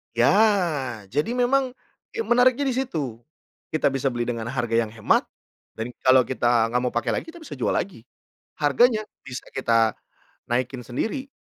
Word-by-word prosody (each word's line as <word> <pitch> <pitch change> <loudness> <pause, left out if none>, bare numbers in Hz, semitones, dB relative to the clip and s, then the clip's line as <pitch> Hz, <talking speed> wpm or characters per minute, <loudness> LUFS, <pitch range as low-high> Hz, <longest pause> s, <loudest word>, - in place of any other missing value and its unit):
Ya, 155 - +2
jadi 150 - 0
memang 255 +1 +2 0.4
ya 455 - -1
menariknya 250 - +4
di 250 - -1
situ, 150 - -3 0.5
kita 155 -3 +2
bisa 135 0 -1
beli 120 -2 -1
dengan 115 -1 -3
harga 120 -2 -1
yang 115 -2 +1
hemat 110 -2 +2 0.5
dan 115 +2 -4
kalau 130 0 +6
kita 120 -3 +1
gak 125 +1 +1
mau 125 0 -1
pakai 120 - 0
lagi - - -12
kita 345 - -12
bisa - - -8
jual - - 0
lagi. 175 - -3 0.5
Harganya 215 - +3 0.2
bisa 125 -1 -6
kita 115 -4 +2 0.6
naikin 125 +1 -1
sendiri 225 - -3
130 Hz, 160 wpm, -24 LUFS, -, 0.6 s, kalau